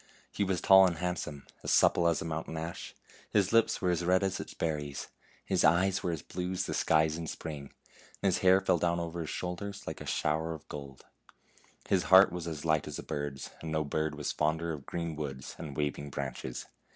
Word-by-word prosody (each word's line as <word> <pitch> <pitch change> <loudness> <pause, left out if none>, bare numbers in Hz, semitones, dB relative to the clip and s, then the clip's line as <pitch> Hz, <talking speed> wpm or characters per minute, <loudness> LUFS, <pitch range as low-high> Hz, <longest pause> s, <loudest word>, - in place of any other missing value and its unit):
He 105 - 0
was 95 -2 0
tall 95 -1 +8
and 85 - -2
handsome; 85 -5 -3 0.2
as - - -1
supple 85 - +5
as 85 -2 +1
a - - -7
mountain 80 0 -4
ash, 80 +2 -6 0.3
his 100 0 +2
lips 115 -1 +3
were 90 - +3
as 85 0 0
red 90 +2 +3
as 95 -1 0
its - - -7
ber 80 -2 0
ries; 70 -1 -6 0.4
his - - +1
eyes 90 +4 +4
were 90 - -1
as 80 -4 -4
blue 90 0 -4
as 95 0 -1
the - - -3
skies 80 0 +2
in 85 -1 -5
spring; 75 -3 -6 0.5
and 100 - +4
his - - +1
hair 95 +1 +5
fell 85 - +2
down 85 0 +1
over 85 0 -4
his 80 - -5
shoulders 95 +3 -5
like - - -6
a - - -7
shower 80 +2 0
of 75 - -13
gold. 70 -3 -8 0.8
His 95 -2 +2
heart 95 +1 +8
was 85 -1 -5
as 80 -1 -5
light 80 -2 +2
as 75 - -5
a - - -6
bird's, 70 -2 -4
and 80 - -5
no 80 0 +1
bird 80 +1 -1
was 75 -1 -2
fonder 80 +2 0
of 70 -3 -8
green 85 -2 -3
woods 70 -4 -5
and 75 -4 -7
waving 75 -1 -2
branches. 65 -2 -5
80 Hz, 220 wpm, -31 LUFS, 75-90 Hz, 0.8 s, tall